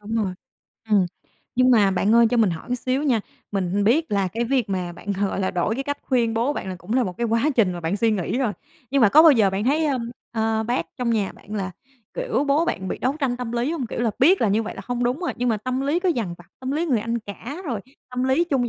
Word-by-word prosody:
Đúng 210 +2 -5
rồi, 205 -4 0 0.6
ừm. 200 -4 +4 0.5
Nhưng 255 +1 +4
mà 210 -5 +5
bạn 195 +3 +2
ơi, 235 0 +7
cho 245 - +2
mình 220 -5 +4
hỏi 165 +7 -6
một 250 - 0
xíu 255 +3 -1
nha, 250 -7 +2 0.3
mình 195 +1 0
biết 305 +9 +2
là 195 -2 +1
cái 230 +5 -2
việc 245 -3 0
mà 180 -2 -2
bạn, 200 +4 -5
gọi 195 -1 0
là, 190 - 0
đổi 190 +4 0
cái 270 +2 -3
cách 285 0 -3
khuyên 235 -4 +1
bố 240 +6 +1
bạn 190 - -5
là 185 - -4
cũng 175 +5 -7
là 255 -1 +3
một 180 -2 -5
cái 235 - 0
quá 230 +6 +2
trình 200 -6 +4
mà 175 - -6
bạn 165 +5 -1
suy 230 +2 +2
nghĩ 210 +3 -1
rồi, 245 -6 +1 0.4
nhưng 275 -3 +3
mà 210 - +7
có 305 +10 +7
bao 325 -2 +8
giờ 215 -7 +4
bạn 195 +2 -2
thấy, 300 +5 +2
ơ, 275 -3 +1 0.3
ơ, 220 -1 0
bác 240 +3 -1
trong 245 -2 -1
nhà 210 -4 0
bạn 210 - -11
là, 195 -3 -2 0.4
kiểu, - - -1
bố 290 +3 +2
bạn 190 - -2
bị - - -3
đấu 265 +4 0
tranh 255 -3 0
tâm 245 -2 -5
lý 245 +6 0
hông? 295 -7 -3
Kiểu 230 - -4
là, 235 -2 +2
biết 350 +9 +5
là 225 - +3
như 215 +3 +2
vậy 220 - -6
là - - -7
hông 245 0 -2
đúng 250 +6 0
rồi, 355 - -1
nhưng 245 0 0
mà 225 - +2
tâm 255 +5 -3
lý 290 +5 0
cứ 370 - +1
dằn 225 - -1
vặt, 175 - -15
tâm 260 0 -3
lý 320 +4 0
người 250 -8 +2
anh 230 +2 -2
cả 235 - -8
rồi 235 -7 -2 0.3
tâm 250 0 -1
lý 265 +6 +3
chung 265 -7 0
235 Hz, 285 wpm, -23 LUFS, 205-265 Hz, 0.6 s, bao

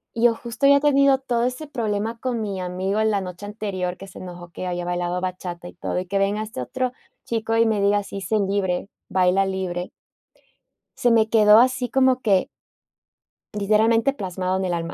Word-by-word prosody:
Yo 230 0 +4
justo 235 +4 -3
había 280 0 +7
tenido 275 -2 +4
todo 245 -3 -1
ese 255 +5 -3
problema 225 -3 -2
con 245 -2 -2
mi 200 -3 -3
amigo 190 +4 -1
la 210 -2 +1
noche 180 +2 -7
anterior, 195 -4 -4
que 195 - -10
se 190 - -12
enojó 175 -1 -9
que 185 - -6
había 175 -1 -3
bailado 175 0 -2
bachata 180 -1 -5
y - - -11
todo, 175 - -3
y 185 - -5
que 195 +2 -1
venga 200 +2 +1
este 220 +4 -5
otro 255 -1 -2 0.3
chico, 225 -1 -1
y 230 - +5
me 215 -2 +1
diga: 205 0 +2
"Sí, 200 0 -7
sé 205 +4 0
libre, 195 -2 -1 0.2
baila 185 +1 +3
libre", 185 -2 -3 1.0
se 245 - +2
me 225 -1 +4
quedó 215 -1 +7
así 250 0 +2
como 260 0 +3
que 195 -5 +2 1.1
literalmente 225 +5 +3
plasmado 185 -4 -2
en 190 - -1
el 180 - -1
alma. 170 0 -3
205 Hz, 190 wpm, -23 LUFS, 185-230 Hz, 1.1 s, había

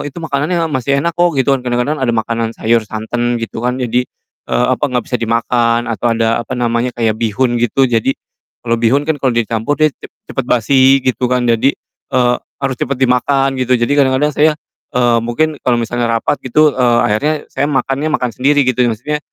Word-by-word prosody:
itu 140 - -9
makanan 145 -1 -1
yang 165 -1 +1
masih 140 +1 0
enak 170 +1 0
kok." 175 -2 +2
Gitu 135 0 +2
kan. 135 - +1
Kadang-kadang 125 +5 -1
ada 130 - 0
makanan 115 0 -2
sayur, 115 0 +2
santan 120 +3 -2
gitu 115 0 -5
kan 125 +1 0
jadi, 125 0 0 0.4
eee, 125 - +1
apa, 130 - -1
gak 125 -2 -1
bisa 125 - 0
dimakan 115 +1 +1
atau 115 +1 0
ada 115 0 +1
apa 130 - -6
namanya, 120 0 0
kayak 110 -2 0
bihun 120 +2 0
gitu. 120 +3 +2
Jadi 115 +3 +1 0.5
kalau 115 -1 +1
bihun 125 +5 +2
kan 160 - +1
kalo 130 -3 +1
dicampur 115 +3 -1
dia 155 -1 +4
cep - - -13 0.2
cepet 135 - -3
basi 130 +3 +4
gitu 125 0 0
kan. 125 -1 +1
Jadi, 115 +4 +2 0.4
eee, 125 -1 +3 0.3
harus 135 -2 -1
cepet 140 - -1
dimakan 135 +2 +2
gitu, 130 0 +2
jadi 120 +3 -1
kadang-kadang 135 +2 +2
saya, 155 +1 +4 0.4
eee, 120 -1 +3
mungkin 150 +6 -1
kalo 125 - +3
misalnya 120 +1 -2
rapat 145 - -1
gitu, 150 +4 +4
eee, 120 -2 +2
akhirnya 145 +9 +1 0.2
saya 145 - 0
makannya 135 +1 -1
makan 125 -4 0
sendiri 145 +2 +2
gitu, 125 -1 +2
maksudnya 125 +7 -2
125 Hz, 195 wpm, -15 LUFS, 115-135 Hz, 0.5 s, dia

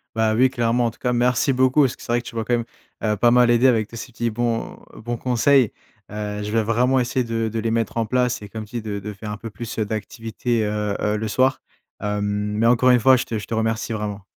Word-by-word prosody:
Bah 110 -1 +2
oui, 130 +3 +5
clairement, 120 -1 +1
en - - 0
tout - - -24
cas, 125 - 0
merci 125 +2 +2
beaucoup, 130 +3 +3
parce 130 -3 +1
que - - -15
c'est 120 - -4
vrai 120 0 +1
que - - -9
tu - - -10
m'as 115 - -1
quand 120 - +1
même, 120 - -2 0.4
heu, 105 -1 +1
pas 120 +3 +4
mal 125 -1 +5
aidé 120 +2 +4
avec 110 -4 +2
tes 115 - -11
ces 125 +2 -8
petits 120 0 -2
bons 115 0 -2 0.2
bons 120 +2 -5
conseils. 125 +1 +3 0.4
Heu, 105 0 -4
je 105 - -4
vais 115 0 +2
vraiment 125 +4 +2
essayer 125 +1 0
de 115 -1 -1
de 110 +1 -4
les 110 0 -1
mettre 115 0 -1
en 115 -1 0
place 125 +1 0
et 105 - -9
comme 110 +1 -6
tu 105 +3 -9
dis, 115 - -3
de 105 -2 -4
de 105 +2 -6
faire 105 +1 -7
un - - -5
peu 115 +2 -8
plus 110 +3 -7
heu, - - +2
d'activités, 115 +2 -3
heu, 105 -1 -1
heu, 105 0 0
le 110 +1 -3
soir. 130 +5 +2 0.4
Hem, 105 0 -2 0.4
mais 115 - +3
encore 125 +2 +4
une 125 -1 +5
fois 130 +3 +6
je 125 - -1
te 110 - -3
je - - -9
te - - -4
remercie, 110 +1 -1
vraiment. 105 -2 -4
115 Hz, 275 wpm, -22 LUFS, 110-125 Hz, 0.4 s, fois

